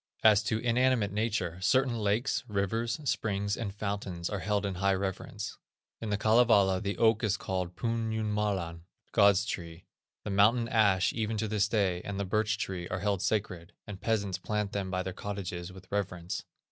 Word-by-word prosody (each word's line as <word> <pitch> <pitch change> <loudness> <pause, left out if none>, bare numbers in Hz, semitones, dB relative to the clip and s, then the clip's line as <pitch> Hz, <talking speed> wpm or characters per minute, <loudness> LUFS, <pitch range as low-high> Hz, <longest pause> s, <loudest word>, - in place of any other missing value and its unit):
As 105 -2 +7
to 110 - +1
inanimate 120 -2 +2
nature, 105 -5 -1
certain 130 +5 +3
lakes, 105 +5 0
rivers, 110 +4 -1
springs, 100 -6 0
and 110 -4 -4
fountains, 100 -4 -4
are 105 - -2
held 105 +1 0
in 100 - -1
high 95 +1 +2
reverence. 95 +2 -4 0.4
In 110 - -4
the 105 - +1
Kalevala 110 -4 +4
the 100 -1 -2
oak 110 0 +3
is 105 -3 +1
called 90 -2 -3
Pun 115 0 -1
Jumalan 105 -6 -1 0.3
(God's 100 -2 +5
tree). 85 -3 -6 0.4
The 105 - -4
mountain 110 +4 +4
ash 100 -5 +3
even 110 -1 -1
to 110 +1 -1
this 105 -1 +1
day, 100 -5 +1
and 100 -1 -5
the 100 - -1
birch 110 +4 +1
tree, 90 -5 -4
are 95 +1 -3
held 100 -2 0
sacred, 95 -3 -2
and 100 -2 -8
peasants 100 -5 0
plant 105 +1 -2
them 100 -2 -2
by 95 0 -1
their 95 - -4
cottages 95 -3 -5
with 95 0 -12
reverence. 90 -4 -3
100 Hz, 175 wpm, -30 LUFS, 95-110 Hz, 0.4 s, As